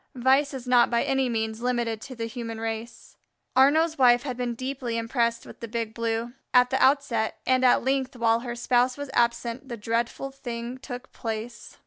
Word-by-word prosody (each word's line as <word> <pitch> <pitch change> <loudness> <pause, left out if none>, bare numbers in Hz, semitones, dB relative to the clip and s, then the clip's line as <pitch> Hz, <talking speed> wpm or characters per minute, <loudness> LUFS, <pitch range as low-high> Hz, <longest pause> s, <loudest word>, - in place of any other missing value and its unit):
Vice 265 +3 +3
is 260 -2 -7
not 245 -1 +4
by 235 -1 +2
any 265 -1 +1
means 220 -1 -2
limited 240 -3 -1
to 260 +1 -8
the 230 -1 -3
human 230 -1 -6
race. 225 0 -6 0.4
Arnaux's 310 +5 +4
wife 245 -2 +5
had 260 -3 -4
been 245 -1 -3
deeply 255 -2 -3
impressed 235 0 0
with - - -12
the 230 - -6
Big 225 -1 -3
Blue, 230 +1 -2 0.2
at 250 0 +6
the 265 - +1
outset, 265 -5 +2
and 255 0 +2
at 250 - +5
length 265 0 0
while 230 -1 +2
her 240 0 -5
spouse 245 +1 +2
was 285 -2 -6
absent 235 +2 0
the 235 - -5
dreadful 230 +5 -2
thing 245 -2 -6
took 255 -1 -8
place. 225 +1 -6
240 Hz, 185 wpm, -26 LUFS, 230-260 Hz, 0.4 s, at